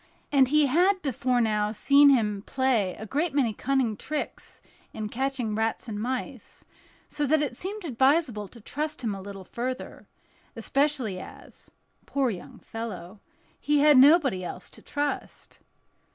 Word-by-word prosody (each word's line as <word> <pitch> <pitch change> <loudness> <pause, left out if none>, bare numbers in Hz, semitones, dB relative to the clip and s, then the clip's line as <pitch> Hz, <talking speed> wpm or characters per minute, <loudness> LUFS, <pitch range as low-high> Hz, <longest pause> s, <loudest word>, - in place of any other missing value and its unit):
And 270 -2 +5
he 300 +2 +4
had 360 +8 +3
before 255 -2 0
now 210 -2 +1
seen 280 +6 +5
him 210 -7 +2
play 245 -8 +1
a 220 - -8
great 295 - -1
many 250 -6 +2
cunning 260 -1 0
tricks 300 +8 -6 0.3
in 215 -1 -5
catching 255 -2 -2
rats 220 +2 -2
and 210 -2 -4
mice, 255 0 -5 0.4
so 295 -1 -2
that 305 +1 +3
it 265 -4 -3
seemed 395 - -5
advisable 265 -5 +1
to 235 - -14
trust 300 +5 -4
him 220 -3 -1
a 195 - -7
little 195 0 -9
further; 255 +5 -5 0.5
especially 275 -9 0
as—poor 270 +6 -6
young 185 - -9
fellow—he 220 +7 -5
had 295 -3 +7
nobody 275 - +5
else 180 0 -7
to - - -13
trust. 290 0 -4
255 Hz, 140 wpm, -26 LUFS, 215-290 Hz, 0.5 s, had